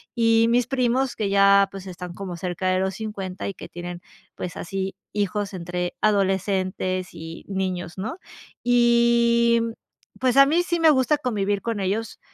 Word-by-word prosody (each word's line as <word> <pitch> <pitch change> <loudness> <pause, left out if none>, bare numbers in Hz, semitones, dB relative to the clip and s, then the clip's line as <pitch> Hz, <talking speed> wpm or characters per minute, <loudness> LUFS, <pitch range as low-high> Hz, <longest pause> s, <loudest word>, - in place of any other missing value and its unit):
y 230 -1 +4
mis 245 0 +3
primos 255 0 0
que 210 -2 -1
ya, 200 0 +5
pues, 195 -1 -9
están 180 -1 -7
como 185 -3 -6
cerca 180 +1 -3
de 185 0 +2
los 190 0 -1
50, 195 -4 -5
y 200 - -3
que - - -10
tienen, 175 0 -7 0.3
pues, 180 - -6
así 190 +2 -4 0.2
hijos 205 0 -1
entre 180 0 -3
adolescentes 190 -2 0
y 165 +1 -9
niños, 185 -2 -3
¿no? 220 - -4 0.5
Y, 235 -1 +4
mm, 230 0 -2 0.5
pues 255 +1 +1
a 275 0 +8
mí 335 +5 +2
sí 345 -1 -1
me 325 -1 +6
gusta 290 +1 +3
convivir 205 -6 -1
con 230 -3 -3
ellos, 205 +4 -2
200 Hz, 165 wpm, -24 LUFS, 185-235 Hz, 0.5 s, a